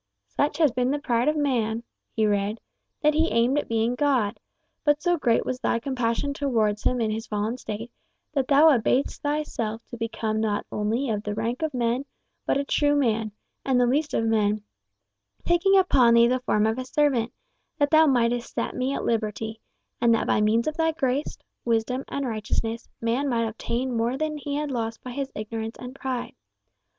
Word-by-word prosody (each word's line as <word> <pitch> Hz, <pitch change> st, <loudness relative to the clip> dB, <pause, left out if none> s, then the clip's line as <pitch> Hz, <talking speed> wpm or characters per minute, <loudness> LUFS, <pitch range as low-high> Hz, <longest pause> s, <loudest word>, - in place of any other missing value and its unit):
"Such 110 Hz, -, -1 dB
has 310 Hz, -5 st, +4 dB
been 250 Hz, +1 st, 0 dB
the 290 Hz, -, +1 dB
pride 245 Hz, -4 st, 0 dB
of 305 Hz, 0 st, +2 dB
man," 235 Hz, -6 st, 0 dB, 0.3 s
he 220 Hz, -, +2 dB
read, 205 Hz, +1 st, 0 dB, 0.4 s
"that 300 Hz, 0 st, +4 dB
he 320 Hz, +2 st, +3 dB
aimed 245 Hz, +5 st, +2 dB
at -, -, -5 dB
being 230 Hz, +1 st, +1 dB
God; 250 Hz, -5 st, +1 dB, 0.4 s
but 295 Hz, -1 st, +3 dB
so 350 Hz, +2 st, +2 dB
great 240 Hz, -8 st, +1 dB
was 255 Hz, -, -3 dB
thy -, -, +1 dB
compassion 250 Hz, +2 st, -1 dB
towards 225 Hz, -7 st, 0 dB
him 250 Hz, -, +1 dB
in 220 Hz, -2 st, 0 dB
his 220 Hz, +2 st, -4 dB
fallen 210 Hz, +2 st, -1 dB
state, 225 Hz, +2 st, -6 dB, 0.4 s
that 270 Hz, -3 st, 0 dB
thou 295 Hz, +3 st, +6 dB
abasedst 250 Hz, +3 st, 0 dB
thyself 265 Hz, -7 st, -2 dB
to 240 Hz, -, -7 dB
become 220 Hz, -1 st, -2 dB
not 210 Hz, -2 st, -1 dB
only 225 Hz, +5 st, -1 dB
of 210 Hz, -1 st, -1 dB
the 210 Hz, -1 st, -4 dB
rank 230 Hz, +5 st, -2 dB
of 315 Hz, -1 st, 0 dB
men, 245 Hz, +1 st, 0 dB, 0.4 s
but -, -, +2 dB
a 280 Hz, -, 0 dB
true 290 Hz, +1 st, +2 dB
man, 225 Hz, -6 st, +1 dB, 0.3 s
and 260 Hz, -2 st, +2 dB
the 245 Hz, -, +4 dB
least 290 Hz, +5 st, 0 dB
of 225 Hz, -, +1 dB
men, 215 Hz, -2 st, +1 dB, 0.8 s
taking 390 Hz, +3 st, +4 dB
upon 255 Hz, -11 st, +5 dB
thee 235 Hz, 0 st, +6 dB
the 255 Hz, +1 st, +1 dB
form 215 Hz, -4 st, +1 dB
of 220 Hz, +3 st, 0 dB
a -, -, -2 dB
servant, 260 Hz, -5 st, +1 dB, 0.5 s
that 290 Hz, -2 st, +1 dB
thou 315 Hz, 0 st, +6 dB
mightest 240 Hz, -2 st, +1 dB
set -, -, -2 dB
me 260 Hz, +2 st, -1 dB
at -, -, -3 dB
liberty, 220 Hz, 0 st, -2 dB, 0.4 s
and 235 Hz, -1 st, +5 dB
that -, -, -1 dB
by -, -, +2 dB
means 220 Hz, +2 st, +2 dB
of 310 Hz, 0 st, -2 dB
thy 325 Hz, 0 st, +2 dB
grace, 280 Hz, -2 st, -1 dB, 0.3 s
wisdom, 235 Hz, +3 st, 0 dB
and 280 Hz, -1 st, -3 dB
righteousness, 225 Hz, +1 st, -3 dB
man 240 Hz, +5 st, 0 dB
might 230 Hz, -2 st, +1 dB
obtain 235 Hz, +3 st, -3 dB
more 235 Hz, +3 st, 0 dB
than 310 Hz, +1 st, -2 dB
he 285 Hz, 0 st, -4 dB
had 295 Hz, -1 st, -2 dB
lost 225 Hz, -2 st, -3 dB
by 255 Hz, -, -6 dB
his 275 Hz, +2 st, -4 dB
ignorance 220 Hz, +1 st, -5 dB
and 250 Hz, 0 st, -8 dB
pride.... 260 Hz, -2 st, -4 dB
240 Hz, 195 wpm, -25 LUFS, 225-280 Hz, 0.8 s, thou